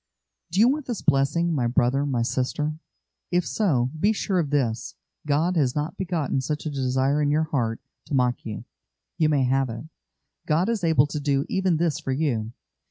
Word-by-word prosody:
Do 185 Hz, -, -1 dB
you 225 Hz, -, +7 dB
want 285 Hz, +2 st, 0 dB
this 240 Hz, -5 st, -4 dB
blessing, 150 Hz, +4 st, +2 dB
my 125 Hz, -6 st, +1 dB
brother, 125 Hz, +4 st, +2 dB
my 125 Hz, -4 st, 0 dB
sister? 150 Hz, +5 st, -2 dB, 0.5 s
If 175 Hz, -1 st, +1 dB
so, 130 Hz, -, +1 dB
be 205 Hz, +6 st, +3 dB
sure 195 Hz, -3 st, 0 dB
of 155 Hz, -4 st, -1 dB
this: 125 Hz, -6 st, -1 dB, 0.3 s
God 160 Hz, +5 st, +2 dB
has 130 Hz, -5 st, +2 dB
not 150 Hz, +3 st, -2 dB
begotten 165 Hz, -8 st, -1 dB
such 150 Hz, +4 st, -3 dB
a 155 Hz, -, -2 dB
desire 135 Hz, +1 st, +1 dB
in 145 Hz, -, +2 dB
your 155 Hz, +2 st, +2 dB
heart 120 Hz, -7 st, -1 dB, 0.3 s
to 145 Hz, -, -2 dB
mock 125 Hz, -1 st, +1 dB
you; 110 Hz, -2 st, -6 dB, 0.5 s
you 155 Hz, -1 st, +4 dB
may 145 Hz, -3 st, +2 dB
have 130 Hz, 0 st, +1 dB
it. 115 Hz, +2 st, -6 dB, 0.6 s
God 165 Hz, +7 st, +2 dB
is 225 Hz, -5 st, -1 dB
able 160 Hz, -5 st, +4 dB
to 150 Hz, +1 st, -4 dB
do 140 Hz, -1 st, 0 dB
even 190 Hz, -3 st, +1 dB
this 165 Hz, -3 st, 0 dB
for 135 Hz, -, -4 dB
you. 125 Hz, -7 st, -1 dB
145 Hz, 190 wpm, -25 LUFS, 130-165 Hz, 0.6 s, you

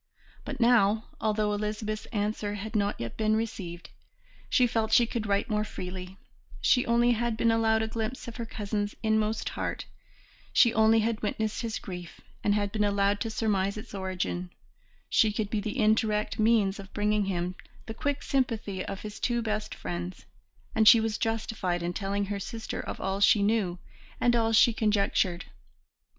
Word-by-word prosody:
But 280 Hz, -2 st, -5 dB
now, 225 Hz, -3 st, +3 dB
although 215 Hz, -1 st, +1 dB
Elizabeth's 215 Hz, +1 st, -3 dB
answer 210 Hz, -1 st, -2 dB
had 215 Hz, +2 st, -6 dB
not 205 Hz, -1 st, 0 dB
yet 115 Hz, -1 st, -5 dB
been 215 Hz, 0 st, +2 dB
received, 190 Hz, -6 st, -4 dB, 0.6 s
she 250 Hz, -, +4 dB
felt 225 Hz, -2 st, 0 dB
she 240 Hz, -, +6 dB
could 230 Hz, -2 st, -3 dB
write 200 Hz, 0 st, +1 dB
more 210 Hz, -1 st, 0 dB
freely; 185 Hz, -2 st, -7 dB, 0.4 s
she 250 Hz, -, +3 dB
only 235 Hz, +1 st, +4 dB
had 235 Hz, -1 st, 0 dB
been 230 Hz, 0 st, +3 dB
allowed 220 Hz, -1 st, +2 dB
a -, -, -1 dB
glimpse 225 Hz, +3 st, -4 dB
of 235 Hz, -, -7 dB
her 235 Hz, -, -4 dB
cousin's 205 Hz, -1 st, -3 dB
inmost 220 Hz, 0 st, +1 dB
heart, -, -, -4 dB, 0.7 s
she 240 Hz, -5 st, +5 dB
only 220 Hz, +1 st, +5 dB
had 225 Hz, 0 st, -1 dB
witnessed 215 Hz, 0 st, -2 dB
his 230 Hz, -2 st, -3 dB
grief 180 Hz, -3 st, -8 dB, 0.2 s
and 205 Hz, -, +3 dB
had 205 Hz, -1 st, 0 dB
been 215 Hz, -1 st, 0 dB
allowed 200 Hz, 0 st, +2 dB
to 225 Hz, -, -2 dB
surmise 205 Hz, -3 st, 0 dB
its 220 Hz, +2 st, -9 dB
origin; 185 Hz, -2 st, -3 dB, 0.6 s
she 220 Hz, -3 st, +3 dB
could 210 Hz, -1 st, -3 dB
be 215 Hz, -, 0 dB
the 215 Hz, +6 st, -4 dB
indirect 215 Hz, -2 st, +1 dB
means 215 Hz, -3 st, +3 dB
of 195 Hz, -1 st, -10 dB
bringing 210 Hz, 0 st, +1 dB
him 180 Hz, -1 st, -2 dB, 0.3 s
the 225 Hz, -, -6 dB
quick 285 Hz, +3 st, -2 dB
sympathy 225 Hz, -8 st, -1 dB
of 195 Hz, -, -6 dB
his 210 Hz, -1 st, -7 dB
two 240 Hz, -1 st, 0 dB
best 215 Hz, -1 st, -3 dB
friends, 175 Hz, +1 st, -6 dB, 0.5 s
and 220 Hz, -1 st, +3 dB
she 230 Hz, -, +10 dB
was 220 Hz, -1 st, -1 dB
justified 215 Hz, -6 st, -1 dB
in 175 Hz, +1 st, -2 dB
telling 200 Hz, +1 st, -1 dB
her 200 Hz, 0 st, -3 dB
sister 225 Hz, +3 st, -5 dB
of -, -, -5 dB
all 195 Hz, +1 st, -2 dB
she 200 Hz, +1 st, +5 dB
knew 200 Hz, -4 st, +1 dB, 0.4 s
and 240 Hz, -1 st, +3 dB
all 225 Hz, -1 st, +2 dB
she 225 Hz, +1 st, +6 dB
conjectured. 200 Hz, -5 st, +1 dB
215 Hz, 175 wpm, -28 LUFS, 200-225 Hz, 0.7 s, she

